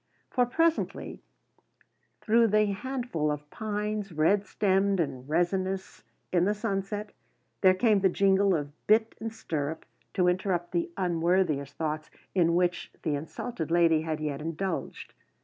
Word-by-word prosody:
For 250 -2 +2
presently 330 +6 0 1.0
through 230 +1 +4
the 215 0 +3
handful 240 - -2
of 150 0 -5
pines, 210 -1 -3
red 180 +6 +2
stemmed 195 -1 +2
and 130 -4 -3
resinous 185 +3 -1 0.3
in 175 -1 +4
the 205 +2 +1
sunset, 205 0 -3 0.5
there 185 -1 +6
came 215 0 +3
the 190 0 +3
jingle 195 0 +3
of 145 -2 -3 0.2
bit 220 +1 +4
and 225 0 -4
stirrup, 160 -7 -4 0.3
to 180 -3 +3
interrupt 180 -1 0
the 340 0 0
unworthiest 170 -5 +1
thoughts 155 -1 -3 0.2
in 170 -3 +3
which 180 0 0
the 155 - 0
insulted 160 +4 -4
lady 165 -2 +4
had 160 -1 -3
yet 150 -2 -3
indulged. 165 +3 -4
185 Hz, 135 wpm, -28 LUFS, 160-210 Hz, 1.0 s, there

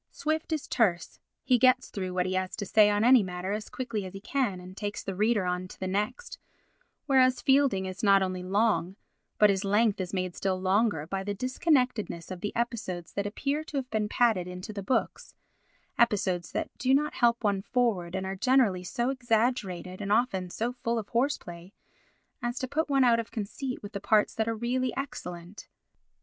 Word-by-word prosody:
Swift 315 +2 -2
is 310 -3 -2
terse, 190 -8 0 0.2
he 250 -2 +3
gets 255 +1 +4
through 185 -2 -4
what 180 0 0
he 185 - -2
has 185 0 -2
to 205 - -4
say 210 +1 +5
on 205 +1 +1
any 250 0 +7
matter 180 0 -4
as 210 +1 -4
quickly 230 -5 -4
as 185 0 -8
he 195 - -7
can 225 -4 -1
and 180 +1 -11
takes 205 0 -4
the 195 - -4
reader 210 +1 +1
on 180 0 -2
to - - -14
the 190 - -3
next, 210 - -3 0.7
whereas 260 -2 +4
Fielding 265 -8 +3
is 185 0 -6
not 195 -2 +5
only 185 -1 -3
long, 190 -2 +1 0.4
but 210 -1 +6
his 195 +1 -1
length 205 0 +2
is 180 - -4
made 185 -2 -2
still 190 -1 -1
longer 190 -4 +1
by 190 +3 -3
the 205 +1 -3
disconnectedness 250 - 0
of 180 -1 -6
the 205 - -2
episodes 210 -8 -3
that 200 0 -2
appear 280 +8 -2
to 305 -2 -6
have 265 -2 -2
been 215 -1 0
padded 220 -8 +2
into 180 +3 -7
the 200 - -5
books—episodes 195 -3 -2
that - - -3
do 260 +1 +3
not 300 +2 +1
help 235 -1 +2
one 200 -2 +1
forward, 200 -7 0
and 190 0 -2
are 190 0 -3
generally 230 -4 +2
so 240 +7 -1
exaggerated, 225 -7 -1
and 200 0 -3
often 205 -5 +1
so 230 +7 -2
full 235 -1 -2
of 215 -3 -4
horse 260 +5 +1
play 175 +2 -11 0.7
as 240 0 -3
to 260 - -2
put 305 +4 -1
one 275 -1 +4
out 235 -2 +4
of 230 - -4
conceit 245 +4 -5
with 205 - -8
the 200 - -4
parts 215 0 +3
that 220 0 -1
are 225 - -1
really 250 +2 -1
excellent. 195 -9 -7
210 Hz, 200 wpm, -28 LUFS, 185-250 Hz, 0.7 s, any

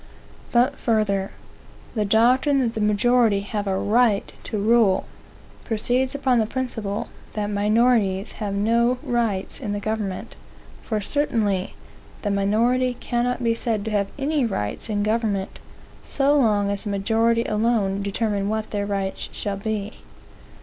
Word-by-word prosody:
But 250 +4 +3
further. 205 -4 +1 0.6
The 215 -3 0
doctrine 250 +7 +3
that 235 -3 0
the 220 - -3
majority 210 0 +3
have 205 0 -4
a 190 -1 0
right 215 0 +2
to 220 - -3
rule, 210 -2 +3 0.6
proceeds 245 +4 0
upon 260 -4 +2
the 220 - +1
principle 225 -5 -3 0.2
that 210 -1 -2
minorities 210 -1 +2
have 200 -2 -2
no 235 +4 +2
rights 230 -6 -1
in 215 -7 -3
the 205 - -2
government; 210 -3 -4 0.5
for 215 -2 -2
certainly 210 -7 0 0.5
the 205 - 0
minority 235 +6 +2
cannot 245 +1 -1
be 230 -1 +3
said 225 -3 -2
to 220 - -3
have 200 -2 +1
any 285 0 0
rights 150 - -3
in 205 -1 0
a - - +1
government, 210 -3 -1 0.4
so 280 +1 +2
long 210 -7 +3
as 200 - -3
the 210 - -4
majority 225 +4 +2
alone 210 -3 +1
determine 200 0 -1
what 220 0 -2
their 205 -1 -2
rights 195 -1 -3
shall 200 -1 -4
be. 215 0 -4
215 Hz, 145 wpm, -23 LUFS, 200-240 Hz, 0.6 s, But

